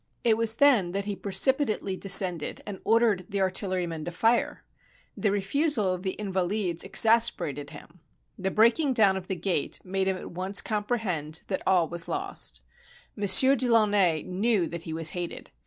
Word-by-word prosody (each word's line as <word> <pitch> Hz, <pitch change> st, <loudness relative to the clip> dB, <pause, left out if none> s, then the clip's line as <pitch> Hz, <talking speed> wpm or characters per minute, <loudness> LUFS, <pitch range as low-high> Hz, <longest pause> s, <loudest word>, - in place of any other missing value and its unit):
It 230 Hz, -2 st, +3 dB
was 225 Hz, 0 st, +2 dB
then 230 Hz, -12 st, +3 dB
that 200 Hz, 0 st, -3 dB
he 205 Hz, -1 st, -4 dB
precipitately 210 Hz, 0 st, 0 dB
descended 185 Hz, -4 st, +1 dB
and 200 Hz, -2 st, -8 dB
ordered 220 Hz, -5 st, +1 dB
the 200 Hz, -1 st, -3 dB
artillerymen 185 Hz, -4 st, -2 dB
to 175 Hz, -, -5 dB
fire. 225 Hz, +7 st, 0 dB, 0.5 s
The 210 Hz, -, 0 dB
refusal 205 Hz, -, 0 dB
of 180 Hz, -, -6 dB
the 190 Hz, -1 st, -3 dB
Invahdes 190 Hz, -3 st, -1 dB
exasperated 225 Hz, -, +1 dB
him. 155 Hz, +3 st, -14 dB, 0.4 s
The 190 Hz, 0 st, -3 dB
breaking 235 Hz, +8 st, +2 dB
down 210 Hz, -5 st, +3 dB
of 185 Hz, -1 st, -7 dB
the 190 Hz, -, -3 dB
gate 175 Hz, -3 st, -2 dB
made 190 Hz, +1 st, -2 dB
him 190 Hz, -1 st, -1 dB
at -, -, -10 dB
once 185 Hz, +2 st, -1 dB
comprehend 205 Hz, -8 st, -3 dB
that 190 Hz, -, -2 dB
all 180 Hz, -3 st, +3 dB
was 170 Hz, +1 st, -2 dB
lost. -, -, -2 dB, 0.5 s
Monsieur 205 Hz, +7 st, +6 dB
de 255 Hz, -1 st, -1 dB
Launay 205 Hz, -8 st, +2 dB
knew 195 Hz, +1 st, 0 dB
that 170 Hz, 0 st, -7 dB
he -, -, -4 dB
was 160 Hz, -1 st, -2 dB
hated. 175 Hz, -1 st, -7 dB
195 Hz, 165 wpm, -26 LUFS, 180-220 Hz, 0.5 s, Monsieur